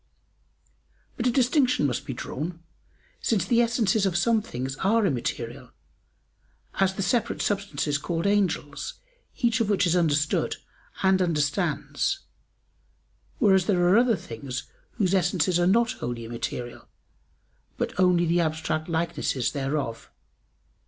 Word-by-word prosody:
But 245 - -1
a - - +3
distinction 255 - +2
must 125 -4 -2
be 130 - -3
drawn: 165 +7 -5 0.6
since 200 -7 +1
the 235 +4 +3
essences 225 -4 +2
of 175 -3 0
some 225 +4 +3
things 130 -6 -5
are 215 +5 +2
immaterial 125 -4 -3 1.1
as 190 0 +2
the 195 - -2
separate 235 +2 0
substances 155 -8 -1
called 165 +3 -2
angels, 200 - 0 0.4
each 235 -1 +1
of 215 - 0
which 200 -1 +3
is 175 0 +2
understood 150 -3 +1 0.5
and 190 0 +4
understands, 170 - 0 1.2
whereas 190 -3 +4
there 175 -3 +3
are 185 - +5
other 240 -2 +3
things 125 - -6 0.3
whose 190 -3 0
essences 180 -1 +2
are 175 - +3
not 230 +5 +3
wholly 120 -1 -5
immaterial, 120 +1 -5 0.9
but - - -2
only 180 -2 +4
the 170 +1 +2
abstract 155 0 -2
likenesses 165 -6 -1
thereof. 135 -4 -3
175 Hz, 125 wpm, -26 LUFS, 145-205 Hz, 1.2 s, are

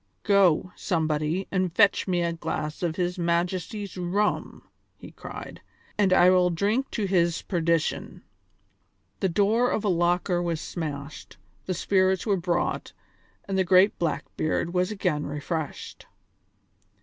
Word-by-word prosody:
"Go, 185 -3 +3
somebody, 160 +1 -1
and 185 -2 0
fetch 205 +2 +3
me 175 -2 +1
a 170 0 -1
glass 155 -2 -4
of 170 -3 -1
his 180 0 -2
Majesty's 175 +4 -2
rum," 185 +4 -1 0.3
he - - -12
cried, - - -9 0.3
"and 200 -3 +2
I 180 0 +6
will 180 -1 +4
drink 205 +10 0
to 215 - -2
his 175 -3 +1
perdition!" 170 -3 -1 1.0
The 190 - +1
door 215 +7 +2
of - - -1
a - - +2
locker 175 0 +1
was 170 -2 -2
smashed, 150 -4 -6 0.3
the 185 - -1
spirits 190 +1 +1
were 205 -3 +2
brought, 175 -1 -2 0.5
and 195 -1 -1
the - - +4
great 185 +3 +4
Blackbeard 165 +1 -2
was 180 0 +1
again 180 -8 -1
refreshed. 150 +1 -5
180 Hz, 135 wpm, -26 LUFS, 170-195 Hz, 1.0 s, I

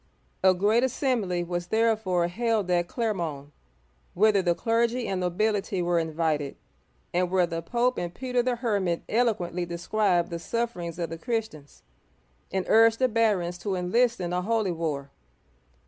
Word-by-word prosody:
A 190 -1 +6
great 210 +6 +3
assembly 230 -9 0
was 175 0 -4
therefore 215 -5 +1
held 215 0 0
at 175 -1 +2
Cler'mont, 170 - -3 0.6
whither 205 +1 +4
the 175 -2 +1
clergy 235 +2 0
and 190 -1 -2
nobility 195 +2 0
were 175 -1 +1
invited, 160 -3 -1 0.6
and 180 0 +1
where 185 -1 +3
the 165 -1 -4
Pope 245 +8 0
and 175 -1 -3
Peter 250 +5 -1
the 245 0 0
Hermit 200 -8 -1
eloquently 200 -7 0
described 175 +1 0
the 170 - -3
sufferings 175 -4 -3
of 170 -2 -3
the 165 - -6
Christians, 220 - -4 0.7
and 190 -1 -1
urged 225 0 +5
the 255 - +3
barons 205 -7 +1
to 190 +2 -2
enlist 230 +7 +1
in 175 -1 -3
a 180 - 0
holy 215 -1 0
war. 150 -5 -3
185 Hz, 150 wpm, -26 LUFS, 175-225 Hz, 0.7 s, A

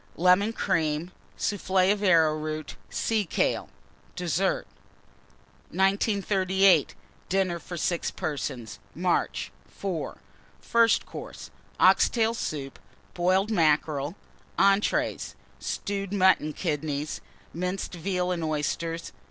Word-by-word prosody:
Lemon 185 +5 +4
Cream. 160 -4 -1 0.3
Soufflé 190 -2 +2
of 205 0 0
Arrowroot. 155 -4 +2
Sea 220 -2 0
kale. 175 - 0 0.5
DESSERT. 180 +2 0 1.0
1938. 190 -3 +2 0.3
DINNER 185 -2 +1
FOR 175 +1 -7
6 170 +1 0
PERSONS 130 - -4 0.2
(March). 175 +1 0 0.2
IV. 185 -5 -4 0.4
FIRST 230 -1 +3
COURSE. - - -9 0.3
Ox - - +6
tail 225 -1 +1
Soup. 145 - -5 0.3
Boiled 185 +4 +2
Mackerel. 155 -3 +1 0.4
ENTREES. 195 +1 +2 0.2
Stewed 200 -1 -3
Mutton 190 -6 +3
Kidneys. 150 -3 -3 0.3
Minced 180 +4 -3
Veal 180 +1 -1
and 170 -2 -2
Oysters. 165 +2 -2
180 Hz, 95 wpm, -27 LUFS, 155-195 Hz, 1.0 s, Ox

